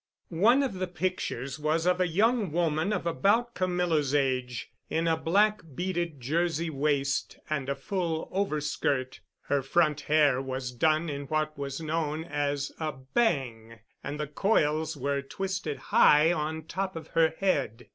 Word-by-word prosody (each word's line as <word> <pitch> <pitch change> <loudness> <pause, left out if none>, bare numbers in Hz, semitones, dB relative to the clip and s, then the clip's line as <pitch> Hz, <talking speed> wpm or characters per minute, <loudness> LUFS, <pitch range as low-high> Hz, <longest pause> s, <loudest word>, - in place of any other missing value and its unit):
One 260 +4 +6
of 265 - -1
the 185 0 -3
pictures 165 -7 -3
was 155 +2 0
of 180 0 +2
a 180 - +3
young 210 +2 +2
woman 165 +2 +1
of 210 - -2
about 210 +8 +2
Camilla's 175 -6 0
age, 130 -3 -1 0.2
in 165 +1 0
a 165 - +3
black 205 +7 +2
beaded 175 -4 -2
Jersey 165 +4 0
waist 140 -1 0
and 140 -3 -1
a 140 - 0
full 165 +2 -2
overskirt. 150 -7 -1 0.2
Her 140 -1 0
front 150 +1 +2
hair 145 -4 +3
was 130 -1 -4
done 155 +6 +2
in 140 -2 -4
what 155 +1 -1
was 140 0 -4
known 155 0 -2
as 145 -3 -2
a 155 -2 -2
"bang," 130 - -1 0.3
and 145 +2 -5
the 150 - -1
coils 155 -2 +1
were 140 +1 -1
twisted 180 0 -4 0.2
high 155 +3 +6
on 160 0 -3
top 190 +3 -3
of 165 - -8
her 160 -1 +2
head. 135 - -1
155 Hz, 155 wpm, -28 LUFS, 140-175 Hz, 0.3 s, One